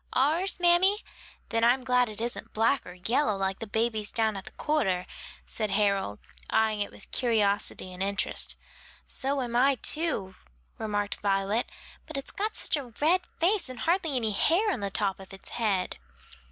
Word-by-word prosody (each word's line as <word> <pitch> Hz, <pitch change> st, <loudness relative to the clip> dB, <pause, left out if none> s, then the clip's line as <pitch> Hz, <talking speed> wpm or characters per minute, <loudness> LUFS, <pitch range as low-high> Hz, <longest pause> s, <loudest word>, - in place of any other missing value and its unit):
"Ours, 330 Hz, +9 st, +2 dB
mammy? 355 Hz, +4 st, +4 dB, 0.4 s
Then 230 Hz, 0 st, +1 dB
I'm 250 Hz, +2 st, +4 dB
glad 250 Hz, -2 st, +3 dB
it 215 Hz, -, -7 dB
isn't 235 Hz, +1 st, -3 dB
black 225 Hz, +5 st, +2 dB
or 180 Hz, -, -8 dB
yellow 215 Hz, +3 st, +1 dB
like 195 Hz, 0 st, -1 dB
the 225 Hz, -, -5 dB
babies 220 Hz, 0 st, 0 dB
down 220 Hz, -2 st, +1 dB
at 195 Hz, -, -6 dB
the -, -, -10 dB
quarter," 190 Hz, -13 st, 0 dB, 0.4 s
said 215 Hz, -2 st, -2 dB
Harold, 195 Hz, -, +1 dB, 0.3 s
eying 220 Hz, -1 st, +2 dB
it 205 Hz, -, -1 dB
with -, -, -15 dB
curiosity 205 Hz, -5 st, +1 dB
and 180 Hz, -, -8 dB
interest. 200 Hz, +1 st, +1 dB, 0.5 s
"So 275 Hz, 0 st, -2 dB
am 240 Hz, -1 st, -4 dB
I 270 Hz, +3 st, +5 dB
too," 260 Hz, -, 0 dB, 0.5 s
remarked 205 Hz, -2 st, -2 dB
Violet, 200 Hz, +3 st, +1 dB, 0.4 s
"but -, -, -3 dB
it's 275 Hz, -, -3 dB
got 425 Hz, +2 st, -2 dB
such -, -, +1 dB
a 260 Hz, -4 st, -7 dB
red 340 Hz, +5 st, +4 dB, 0.2 s
face 355 Hz, -1 st, +2 dB
and 255 Hz, -, -8 dB
hardly 330 Hz, -4 st, +1 dB
any 225 Hz, -4 st, +1 dB
hair 355 Hz, -, +3 dB
on 355 Hz, -, -2 dB
the 200 Hz, -1 st, -2 dB
top 195 Hz, -1 st, -1 dB
of 195 Hz, 0 st, -11 dB
its 190 Hz, -, -1 dB
head." 200 Hz, -, -1 dB
225 Hz, 175 wpm, -28 LUFS, 200-285 Hz, 0.5 s, I